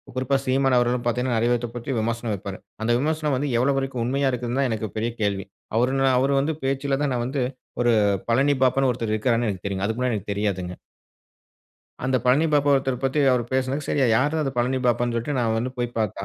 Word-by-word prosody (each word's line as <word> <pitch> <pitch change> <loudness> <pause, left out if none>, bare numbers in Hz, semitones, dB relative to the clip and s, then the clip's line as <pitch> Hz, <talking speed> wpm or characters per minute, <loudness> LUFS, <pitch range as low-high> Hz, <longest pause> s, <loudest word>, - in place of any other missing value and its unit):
குறிப்பா 135 +1 +1
"சீமான்" 135 0 +2
அவர்களும் 120 0 +1
பார்த்தீங்கன்னா, 125 0 0
நெறைய 120 +2 +2
பேத்த 120 0 -1
பத்தி 120 +2 -4
விமர்சனம் 115 0 -2
வைப்பாரு. 95 -1 -6 0.3
அந்த 120 - +1
விமர்சனம் 155 -1 0
வந்து 140 +2 -1
எவ்வளோ 135 +2 +2
வரைக்கும் 135 -3 -2
உண்மையா 135 +2 +1
இருக்குதுன்னு 125 +1 -2
தான், 130 - +1
எனக்கு 110 -1 -3
பெரிய 115 +2 -1
கேள்வி. 100 -1 0 0.3
அவரு 125 +3 +2
ந - - +2
அவரு 135 +2 +2
வந்து 150 +3 0
பேச்சுல 135 +1 0
தான் 135 -3 0
நான் 120 -1 -1
வந்து, 130 0 -1 0.4
ஒரு 120 -1 +3 0.4
பழனி 135 +4 +3
பாபானு 135 +1 +3
ஒருத்தர் 115 -2 -2
இருக்கிறாருன்னு 115 +1 +1
எனக்கு 95 -1 -6
தெரியுங்க. 100 0 -2
அதுக்கு 110 +2 -3
முன்னாடி 125 -3 +1
எனக்கு 100 +1 -6
தெரியாதுங்க. 95 -3 -2 1.3
அந்த 130 0 +1
"பழனி 140 +6 +4
பாபா" 145 -1 +3
ஒருத்தர 135 -2 0
பத்தி 135 +3 0
அவரு 120 -2 +1
பேசினது, 130 +3 0
சரி 145 - +1
யாரு 135 +6 +3
தான் 155 - +1
அந்த 135 - -2
பழனி 130 +2 +1
பாபானு 120 0 +1
சொல்லிட்டு, 120 +4 -2
நான் 115 -1 +1
வந்து 125 +3 -2
போயி 120 -1 -1
பார்த்தா, 100 -2 -2
125 Hz, 210 wpm, -24 LUFS, 115-135 Hz, 1.3 s, பழனி